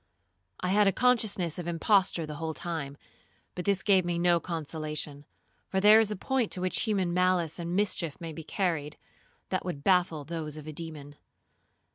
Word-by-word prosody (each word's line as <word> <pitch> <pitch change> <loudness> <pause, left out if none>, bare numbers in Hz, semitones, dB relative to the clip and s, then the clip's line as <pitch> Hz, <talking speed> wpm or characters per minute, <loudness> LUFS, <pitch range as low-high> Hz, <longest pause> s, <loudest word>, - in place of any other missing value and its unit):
I 180 - -1
had 205 +1 +4
a - - +5
consciousness 205 -8 +1
of 175 - -5
imposture 175 0 +2
the 150 -1 -7
whole 160 -1 -4
time, 155 -5 -4 0.6
but 180 - -5
this 195 -1 +1
gave 195 -3 +4
me 175 0 -1
no 175 0 +3
consolation, 155 -3 -5 0.4
for 190 - 0
there 210 +3 +8
is 220 -2 +3
a 210 - -2
point 255 +3 -1
to 180 - -5
which 185 +5 +1
human 190 -5 0
malice 180 -3 +1
and 170 +1 -3
mischief 185 -6 0
may 165 -2 -6
be 165 - -8
carried, 155 -5 -2 0.5
that 185 - -1
would 160 -6 -5
baffle 175 -5 +2
those 155 -1 -5
of 150 - -9
a 155 - -7
demon. 150 -3 -8
175 Hz, 180 wpm, -29 LUFS, 155-190 Hz, 0.6 s, there